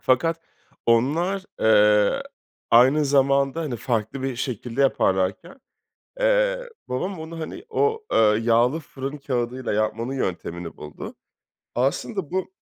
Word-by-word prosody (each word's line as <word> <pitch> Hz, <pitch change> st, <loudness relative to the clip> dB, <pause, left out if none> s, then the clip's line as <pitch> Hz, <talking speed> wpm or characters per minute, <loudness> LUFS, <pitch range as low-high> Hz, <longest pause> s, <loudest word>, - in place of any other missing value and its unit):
Fakat, 165 Hz, +6 st, +1 dB, 0.5 s
onlar, 160 Hz, +12 st, +2 dB, 0.2 s
eee, 105 Hz, -1 st, +4 dB, 0.5 s
aynı 130 Hz, +6 st, +6 dB
zamanda, 140 Hz, +1 st, +2 dB
hani, 145 Hz, -7 st, -3 dB
farklı 115 Hz, +2 st, -2 dB
bir 135 Hz, -2 st, -2 dB
şekilde 125 Hz, 0 st, -4 dB
yaparlarken, 95 Hz, -, +1 dB, 0.6 s
eee, -, -, +2 dB, 0.2 s
babam 180 Hz, +8 st, -3 dB
onu, 165 Hz, +1 st, -7 dB
hani, 350 Hz, -, -7 dB
o, 445 Hz, 0 st, 0 dB
eee, -, -, +4 dB, 0.2 s
yağlı 120 Hz, +6 st, +3 dB
fırın 140 Hz, -1 st, -6 dB
kâğıdıyla 125 Hz, -2 st, -2 dB
yapmanın 110 Hz, +4 st, -1 dB
yöntemini 85 Hz, -7 st, -4 dB
buldu. 75 Hz, 0 st, -9 dB, 0.6 s
Aslında 145 Hz, -, -1 dB
bu 185 Hz, 0 st, -2 dB
135 Hz, 115 wpm, -24 LUFS, 115-165 Hz, 0.6 s, aynı